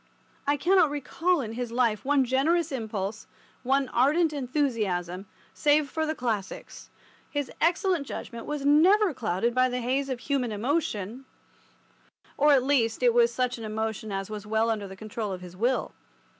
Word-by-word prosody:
I 290 0 +2
cannot 360 +1 +4
recall 310 +4 0
in 225 -3 -5
his 240 0 -4
life 235 -3 +1
one 280 -1 +3
generous 300 +6 +1
impulse, 220 -4 -4 0.3
one 270 +1 +1
ardent 305 +6 +2
enthusiasm, 215 - -1 0.3
save 295 -1 +2
for 315 -1 -1
the 315 - -1
Classics. 220 -7 -4 0.4
His 290 -3 -3
excellent 345 -2 +1
judgment 235 -2 -7
was 295 -2 -3
never 360 +6 +5
clouded 230 -1 -1
by 255 +1 +3
the 250 0 -2
haze 265 +3 -1
of 255 -2 -3
human 270 -5 -1
emotion—or, 230 - -2 1.3
at 270 -3 +5
least, 255 -4 +1
it 240 -1 +5
was 235 0 +4
such 250 0 -1
an - - -7
emotion 220 0 -3
as 195 0 -3
was 210 0 -7
well 220 +1 +1
under 210 -3 -3
the 190 - -10
control 215 +1 -5
of 185 - -7
his 180 -1 -10
will. 240 +7 0
250 Hz, 160 wpm, -27 LUFS, 220-285 Hz, 1.3 s, never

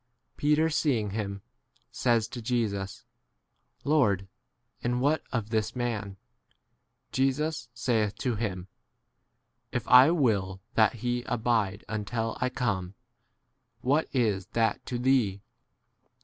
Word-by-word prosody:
Peter 150 +2 +3
c 160 - -3
seeing 115 -9 +1
him, 100 -2 -4 0.2
* - - -40
says 115 -3 +2
to 120 +1 -7
Jesus, 110 -5 -2 0.8
Lord, 105 -11 +2 0.5
22 - - -12
and 125 - 0
what 145 +4 +2
[of] 115 -3 -2
this 110 +1 0
man 110 -5 -2
P - - -31 0.9
Jesus 135 0 0
saith 115 -3 0
to 125 +3 -1
him, 100 -5 -3 1.0
If - - -3
I 125 +3 +8
will 105 - +1
that 110 +2 +4
he 120 0 0
abide 110 -4 0
until 110 +1 -2
I 125 - +2
come, 100 -8 -2 0.9
what 145 +5 +2
is 105 -8 +1
that 115 -2 +1
to 125 - -2
2 120 - -5
Hhee? 120 -7 +2
115 Hz, 130 wpm, -28 LUFS, 105-125 Hz, 1.0 s, I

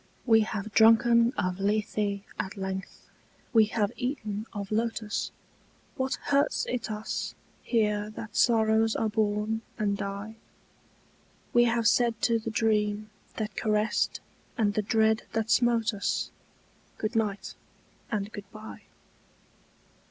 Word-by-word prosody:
We 225 -3 +6
have 215 -1 -2
drunken 230 +1 +6
of 180 +1 -1
Lethe 205 0 0 0.2
at 195 +2 -3
length, 190 0 -5 0.5
we 225 -2 +7
have 210 -1 0
eaten 220 -5 -3
of 200 -2 -6
lotus; 225 -1 -1 0.7
What 260 0 -1
hurts 280 +1 +2
it 245 -3 -2
us 215 0 -4 0.3
here 210 -3 +1
that 220 - -8
sorrows 220 -1 +3
are 220 - 0
born 215 0 0 0.2
and 205 -2 +1
die? 200 +3 -5 1.2
We 240 0 +6
have 230 -1 +2
said 235 -2 +3
to 230 -1 +3
the 220 - -4
dream 215 -1 0 0.2
that 215 -1 -4
caressed 215 0 0 0.4
and 210 -3 +2
the 215 - +1
dread 220 +1 +2
that 225 0 0
smote 235 -3 +3
us 200 -1 -1 0.7
Goodnight 215 -3 -1 0.6
and 210 -1 -2
goodbye. 215 +1 -9
215 Hz, 120 wpm, -28 LUFS, 210-225 Hz, 1.2 s, we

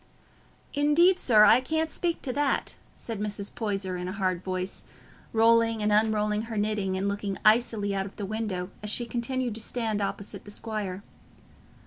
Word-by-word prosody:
"Indeed, 320 +6 +4
sir, 215 -4 +6
I 240 - +6
can't 315 +4 -1
speak 340 -2 -2
to 255 - -2
that," 285 0 0 0.2
said 225 -3 -6
Mrs. 205 -1 -3
Poyser 195 -4 -2
in 180 0 -4
a - - -3
hard 185 -3 -1
voice, 185 0 -4 0.5
rolling 230 -1 +3
and 210 - +2
unrolling 210 0 +2
her 225 - -4
knitting 205 -2 0
and 195 +1 -1
looking 200 -1 -2
icily 215 -2 +3
out 195 0 -1
of 200 - -13
the 205 - -4
window, 195 -3 -3
as 210 - -4
she 240 +3 +1
continued 240 +1 -2
to 220 - -4
stand 220 -3 -1
opposite 200 0 -4
the - - -12
squire. 205 -3 -4
215 Hz, 170 wpm, -27 LUFS, 200-230 Hz, 0.5 s, sir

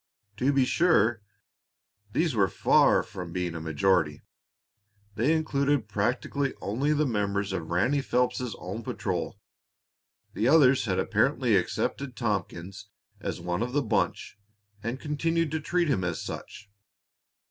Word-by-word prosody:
To 130 +4 +2
be 135 -2 +3
sure, 120 - +3 0.9
these 160 +5 +1
were 100 -4 +3
far - - +4
from 90 -2 -8
being 90 -1 -2
a 80 - -5
majority. 80 0 +1 0.9
They 120 +8 +1
included 145 -6 +1
practically 120 +6 -1
only 130 +9 -1
the 150 0 +2
members 100 -4 -1
of 85 -4 -4
Ranny 120 +12 +2
Phelps's 125 -2 0
own 95 +6 -6
patrol; - - -3 0.9
the 110 - 0
others 135 -4 +5
had 95 -4 0
apparently - - +2
accepted 140 -3 -1
Tompkins 95 -5 -3 0.3
as - - -4
one 90 +3 -2
of 125 +1 -2
the 145 0 +2
bunch 105 -2 -1 0.4
and 115 +5 -4
continued 165 +1 -1
to 160 - -1
treat 175 +3 0
him 105 -10 +1
as 90 -2 -2
such. 105 - -7
115 Hz, 135 wpm, -27 LUFS, 95-140 Hz, 0.9 s, others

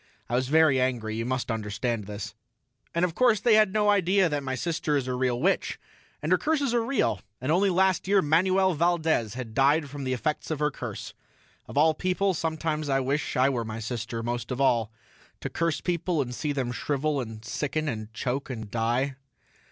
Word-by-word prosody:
I - - -6
was 125 +1 +1
very 155 -3 +4
angry, 120 -4 -1
you 115 +1 -2
must 130 -1 -1
understand 110 0 -2
this. 105 -1 -6 0.6
And 170 +1 +3
of 175 - -3
course 235 0 +3
they 230 +3 +4
had 215 -2 +5
no 210 0 +3
idea 190 -1 +3
that 145 -1 -1
my 130 -1 -3
sister 155 -1 -1
is 130 -2 -2
a 130 - -1
real 125 -1 0
witch, 190 +8 0 0.4
and - - -1
her - - +5
curses 290 -5 +1
are 235 -1 +2
real, 230 - 0 0.2
and 130 +4 -1
only 195 +4 +3
last 185 0 +2
year 200 0 +4
Manuel 185 +5 +3
Valdez 160 -9 +1
had 125 -3 -6
died 140 +3 +3
from 145 -1 -6
the 130 -1 -1
effects 130 +5 -2
of 155 - -1
her 150 +1 +1
curse. - - -6 0.5
Of - - -7
all 155 +2 +5
people, 185 +4 0
sometimes 160 -2 -2
I 135 0 +3
wish 140 +2 -1
I 130 +1 +5
were 125 -4 -1
my 110 0 -5
sister 115 0 -4
most 120 0 -3
of 125 0 -3
all, 120 -5 +2 0.5
to - - -5
curse 165 -2 -1
people 175 -1 -1
and 125 -3 -1
see 150 +4 -2
them 130 -4 -2
shrivel 145 +2 -1
and 110 -2 -8
sicken 150 +5 -2
and 110 -5 -4
choke 125 +5 -3
and 110 -5 -6
die. 120 +4 0
140 Hz, 205 wpm, -27 LUFS, 120-170 Hz, 0.6 s, had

